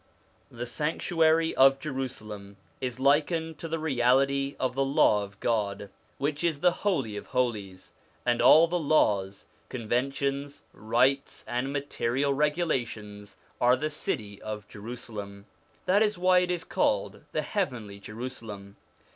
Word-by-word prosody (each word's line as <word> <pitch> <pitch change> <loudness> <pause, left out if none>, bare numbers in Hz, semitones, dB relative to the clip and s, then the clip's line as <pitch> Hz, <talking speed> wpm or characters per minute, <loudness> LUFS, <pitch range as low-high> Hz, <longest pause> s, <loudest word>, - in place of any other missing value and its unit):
The 120 +1 -6
sanctuary 160 +5 +1
of 135 +1 +6
Jerusalem 110 -8 -6 0.2
is 125 -1 -4
likened 155 +4 +1
to 165 - -5
the 165 0 -2
reality 140 -1 +2
of 130 -1 0
the 135 +1 +1
Law 135 -6 +3
of 100 0 -11
God, 100 -3 -1 0.3
which 145 +2 -2
is 160 -4 0
the 180 0 +5
Holy 150 - -1
of - - -8
Holies, 105 -7 -2 0.3
and 120 -1 +2
all 160 +2 +8
the 175 +1 -1
laws, 100 - +1 0.2
conventions, 135 +4 -2
rites, 125 +6 +1
and 125 +3 -2
material 140 -1 -1
regulations 120 - -2 0.2
are 125 +1 +5
the 155 +4 -3
city 105 -8 -4
of 105 -1 -6
Jerusalem 105 -2 -8 0.4
this 200 +4 +4
is 210 -3 0
why 180 0 +5
it 180 0 0
is 175 -2 -1
called 100 -1 0
the 155 - -1
heavenly 125 - -3
Jerusalem. 110 -3 -8
130 Hz, 135 wpm, -28 LUFS, 105-150 Hz, 0.4 s, all